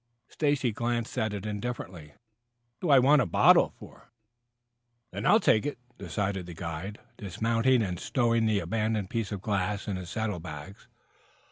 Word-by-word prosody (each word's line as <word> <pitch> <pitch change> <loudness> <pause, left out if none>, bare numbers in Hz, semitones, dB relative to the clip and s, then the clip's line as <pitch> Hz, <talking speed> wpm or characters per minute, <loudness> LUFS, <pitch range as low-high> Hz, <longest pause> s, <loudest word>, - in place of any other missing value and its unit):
Stacy 145 -5 0
glanced 120 +1 -2
at 110 -1 0
it 100 0 -5
indifferently; 105 -7 -5 0.7
"What - - -47
do 175 - -1
I 140 - +7
want 135 +3 +5
of - - 0
a - - -12
bottle?" - - +3 1.1
"Then - - -3
I'll - - +6
take 110 - +3
it," 145 - -3 0.2
decided 95 -3 -3
the 90 - -8
guide, 90 +3 -5 0.2
dismounting 115 +5 +1
and 90 -4 -3
stowing 115 -3 +1
the 105 -2 +1
abandoned 110 -3 -1
piece 115 -3 -2
of 100 -2 -5
glass 100 -1 -1
in 100 -3 -2
his 90 -2 -7
saddle 110 -4 -2
bags. 80 +3 -9
105 Hz, 160 wpm, -28 LUFS, 95-115 Hz, 1.1 s, I